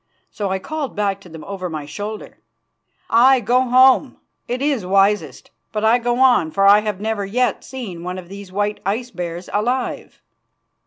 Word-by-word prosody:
So 205 -2 -3
I 190 - 0
called 290 +5 -5
back 200 -1 -1
to 180 - -14
them 160 -1 -10
over 190 -1 -5
my 155 -3 -5
shoulder: 205 +8 -7 0.7
"Aye, 255 +3 +6
go 245 +3 +2
home, 260 +2 +4 0.3
it 245 +1 -2
is 275 -6 0
wisest; 195 -6 +1 0.2
but 215 0 -1
I 230 +3 +4
go 240 0 -1
on 250 -11 +4
for 195 +4 +1
I 200 +1 +7
have 210 -3 -3
never 215 -1 -2
yet 245 +6 0
seen 220 -10 -7
one 180 +1 -4
of 180 -2 -9
these 200 0 -10
white 205 +2 -1
ice 230 +6 -2
bears 175 -2 -6
alive." 245 +5 -2
210 Hz, 175 wpm, -20 LUFS, 190-245 Hz, 0.7 s, I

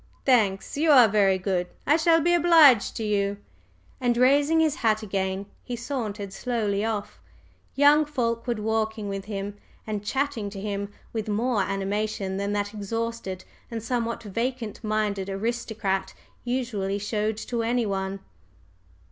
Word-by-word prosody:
"Thanks 215 -4 +2
you 315 +2 +2
are 255 -6 +8
very 200 -2 +3
good. 185 -1 -1 0.2
I 295 - +5
shall 330 0 +4
be 345 +3 +3
obliged 325 -9 +6
to 225 - -3
you." 200 -1 0 0.6
And 245 -2 +1
raising 285 +5 +4
his 315 -2 +2
hat 220 -1 +1
again 190 -1 -2 0.2
he 245 - -4
sauntered 220 -6 -4
slowly 215 -5 -1
off, 220 -2 -3 0.6
young 290 +2 +5
Fulkeward 235 -4 -1
walking 220 0 -1
with 195 -1 -4
him 205 -1 -5 0.3
and 210 -2 -3
chatting 265 -2 -1
to 200 -1 -8
him 200 0 -4 0.2
with 220 -2 -3
more 220 +1 +1
animation 195 0 -2
than 200 +1 -2
that 205 0 -2
exhausted 215 -2 -4 0.3
and 225 -2 -5
somewhat 235 -1 -2
vacant 230 +1 -3
minded 210 -3 -1
aristocrat 200 -2 -2 0.3
usually 235 -6 -2
showed 210 +1 -1
to 235 +1 -3
anyone. 200 -5 -1
215 Hz, 140 wpm, -26 LUFS, 200-245 Hz, 0.6 s, are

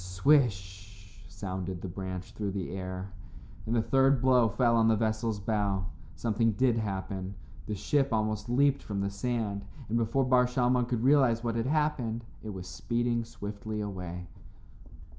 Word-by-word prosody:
"Swish" 100 -2 0
sounded 95 -2 -5
the - - -3
branch 95 0 -6
through 105 -2 -3
the 95 -2 -4
air, 95 0 -5 0.6
and 115 - +1
the 115 - +2
third 135 +1 +4
blow 125 -2 +4
fell 120 +2 +2
on 115 -1 +4
the 110 - +5
vessel's 110 0 0
bow. 100 -2 0 0.3
Something 115 0 +1
did 125 +1 +2
happen. 95 -2 -3 0.3
The 105 - -2
ship 135 +7 +1
almost 110 0 -1
leaped 140 +3 +3
from 100 -2 -3
the 100 0 -1
sand, 105 -1 -2 0.3
and 115 +2 +1
before 115 +4 +1
Bar 125 -1 +4
Shalmon 125 -1 +2
could 120 -2 -1
realize 130 -4 +4
what 115 -1 0
had 115 +1 0
happened 140 -6 0 0.2
it 110 - -7
was 95 -3 -6
speeding 120 +10 -1
swiftly 105 -1 -6
away. 90 -3 -5
110 Hz, 160 wpm, -30 LUFS, 100-120 Hz, 0.6 s, the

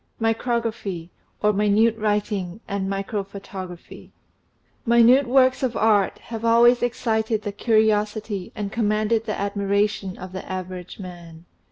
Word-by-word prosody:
MICROGRAPHY 225 -6 -2 0.3
OR 210 0 +4
MINUTE 210 +2 +3
WRITING 205 -3 -2
AND 195 -1 -2
MICROPHOTOGRAPHY 195 -2 -6 0.8
INUTE 235 +3 +6
works 260 0 +4
of 255 -3 -1
art 210 -3 +3
have 225 -1 -7
always 235 +1 +5
excited 220 -2 0
the 205 - -3
curiosity 215 -2 0
and 205 -2 -4
commanded 215 0 0
the 215 - -2
admiration 200 -1 -1
of 185 0 -8
the 190 0 -7
average 185 -1 -6
man. 175 -3 -10
210 Hz, 120 wpm, -23 LUFS, 195-225 Hz, 0.8 s, INUTE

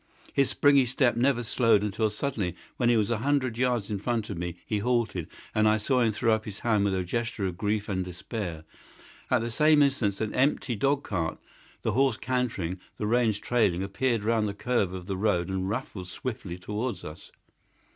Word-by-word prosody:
His 140 -1 +3
springy 140 -3 +4
step 120 -1 +2
never 120 0 +2
slowed 115 -2 +3
until 105 +1 0
suddenly, 105 -5 -2 0.2
when 120 -2 +2
he 120 - +4
was 105 0 +1
a 115 - 0
hundred 135 -2 +1
yards 120 -4 0
in 100 - -1
front 115 0 -2
of - - -4
me, 90 -1 -3
he 105 - -1
halted, 115 -7 0 0.3
and 110 0 +4
I 110 - +3
saw 125 +4 +1
him 115 -2 +3
throw 115 +2 +2
up 110 0 -1
his 100 -2 -8
hand 110 -4 +2
with 100 -1 +1
a 95 - 0
gesture 115 +2 -2
of 90 -2 -2
grief 105 +2 -1
and 95 -2 -1
despair. 90 -2 -5 0.7
At 125 -2 +3
the 115 +1 -3
same 150 +4 +5
instant 120 -8 +1
an 110 -1 -2
empty 130 -2 +1
dog 140 +6 +1
cart, 85 -5 -2 0.5
the 115 - +1
horse 130 0 +2
cantering, 110 -9 -2 0.2
the 105 - -2
reins 115 -1 +2
trailing, 100 -6 +1
appeared 115 +3 0
round 110 -1 +2
the 100 - -4
curve 105 -4 0
of 90 -1 -6
the 95 0 -3
road 95 -4 +1
and 95 0 -2
rattled 105 -5 -4
swiftly 95 -3 -5
towards 105 +7 -4
us. 75 +1 -10
110 Hz, 200 wpm, -28 LUFS, 100-125 Hz, 0.7 s, same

